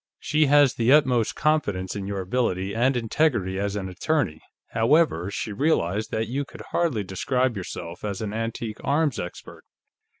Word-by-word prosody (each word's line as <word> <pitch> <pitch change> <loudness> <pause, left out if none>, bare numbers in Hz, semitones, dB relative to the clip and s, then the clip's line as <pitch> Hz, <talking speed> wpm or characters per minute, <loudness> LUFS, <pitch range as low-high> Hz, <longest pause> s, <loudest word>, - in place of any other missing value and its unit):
"She 155 0 +2
has 145 -2 +5
the 115 +2 +2
utmost 130 -6 +4
confidence 100 -13 0
in 100 -1 -4
your 100 -1 -3
ability 95 -2 -1
and 125 +3 +2
integrity, 115 -6 0
as 100 0 -1
an 100 -2 -3
attorney; 95 - -1 0.3
however, 115 - +2
she 105 +1 -4
realized 105 - 0
that 110 +1 -2
you 135 +4 -2
could - - -11
hardly 155 -12 +1
describe 125 +6 0
yourself 85 -2 -7
as 100 -2 -3
an 105 -2 -4
antique 115 -1 -4
arms 145 -2 +1
expert. 90 - -8
115 Hz, 160 wpm, -25 LUFS, 95-140 Hz, 0.3 s, has